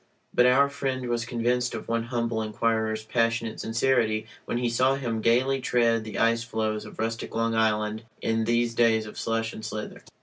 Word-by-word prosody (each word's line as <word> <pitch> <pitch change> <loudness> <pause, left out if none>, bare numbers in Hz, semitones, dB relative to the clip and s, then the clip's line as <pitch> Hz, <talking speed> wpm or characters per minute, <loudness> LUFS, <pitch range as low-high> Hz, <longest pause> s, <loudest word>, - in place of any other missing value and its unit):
But 125 - +5
our 135 +3 +5
friend 135 -3 -3
was 120 -1 -1
convinced 125 +1 0
of - - -7
one 115 0 -1
humble 115 -2 -1
inquirer's 110 0 0
passionate 115 0 0
sincerity 115 -2 +1 0.2
when - - -2
he 120 0 0
saw 130 +3 +2
him 115 -5 -2
gayly 130 +4 +2
tread 115 -3 +2
the 110 - -6
ice 115 0 +2
floes 110 -2 -2
of 105 - -11
rustic 115 +1 -3
Long 115 0 +1
Island 110 0 0
in 115 0 0
these 120 0 +1
days 115 -2 +3
of 105 - -8
slush 115 0 -1
and 110 - -9
slither. 105 -1 -6
115 Hz, 180 wpm, -26 LUFS, 110-120 Hz, 0.2 s, But